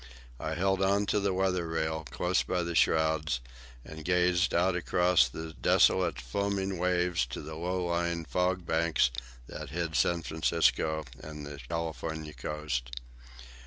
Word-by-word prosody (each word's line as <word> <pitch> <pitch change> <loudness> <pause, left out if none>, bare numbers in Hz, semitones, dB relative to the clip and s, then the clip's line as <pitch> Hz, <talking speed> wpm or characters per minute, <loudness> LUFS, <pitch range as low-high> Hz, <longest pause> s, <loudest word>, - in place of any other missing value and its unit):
I 80 - -3
held 95 +2 +1
on 100 +1 +3
to 105 - +3
the 100 -1 +1
weather 90 -2 0
rail, 80 -1 -2
close 90 +1 +1
by 90 -1 -1
the 85 0 -3
shrouds, 80 -3 +2 0.5
and 80 0 -9
gazed 90 +1 +2
out 90 +2 +2
across 90 -4 +3
the 80 +4 -7
desolate 85 -1 +3
foaming 95 +7 -2
waves 90 -3 +1
to - - -6
the 80 +1 -7
low 90 +3 -2
lying 85 -1 -1
fog 90 +1 0
banks 80 -7 +2 0.3
that - - -8
hid 85 0 -3
San 85 +1 +2
Francisco 80 -1 +1 0.2
and 75 -1 -8
the 75 -1 -8
California 80 -2 -4
coast. 70 -7 -4
85 Hz, 145 wpm, -30 LUFS, 80-90 Hz, 0.5 s, on